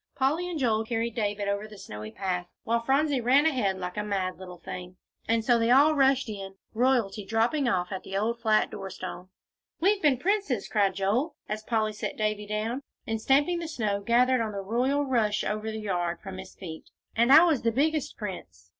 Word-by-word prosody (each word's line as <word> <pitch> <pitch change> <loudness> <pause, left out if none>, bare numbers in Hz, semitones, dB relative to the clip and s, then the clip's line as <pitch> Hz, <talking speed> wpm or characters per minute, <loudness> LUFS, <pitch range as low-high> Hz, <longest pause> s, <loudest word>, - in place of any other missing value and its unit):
Polly 305 +7 +1
and 345 - -3
Joel 225 -5 +1
carried 230 0 -2
David 205 -2 -1
over 200 +1 -1
the 210 -1 -12
snowy 105 - -8
path, 180 - -3 0.2
while 230 +1 +1
Phronsie 275 +3 +1
ran 265 +5 +4
ahead 235 -11 +1
like 180 +1 -5
a 210 - 0
mad 190 -3 -2
little 180 -1 -9
thing. 180 +1 -8 0.3
And 225 0 +1
so 240 -2 +4
they 230 0 +2
all 285 +5 +6
rushed 270 -2 +3
in, 195 -3 -7 0.2
royalty 230 -4 +1
dropping 225 +7 +1
off 180 -3 0
at 190 - -4
the 195 - -4
old 230 +3 -1
flat 215 -2 +2
door 195 -1 -6
stone. 185 0 -7 0.5
"We've 395 +3 +2
been 290 -4 +4
princes," 390 - 0
cried 200 -3 +1
Joel, 230 - 0
as 215 +1 -3
Polly 215 -1 0
set 210 - -5
Davie 215 -1 -1
down, 220 +5 -2 0.2
and 225 0 -2
stamping 290 +8 +3
the 335 - -4
snow, 210 -9 -1
gathered 245 +4 +3
on 220 -2 -2
the 200 - -3
royal 255 +8 +1
rush 220 -5 +1
over 215 +1 -2
the 220 - -4
yard, 175 -5 -2
from 190 -2 -8
his 190 0 -10
feet, 160 -4 -9 0.3
"and 235 +3 +3
I 315 +4 +10
was 320 -7 +2
the 230 - +2
biggest 300 +4 0
prince." 95 - -7
220 Hz, 205 wpm, -27 LUFS, 195-265 Hz, 0.5 s, I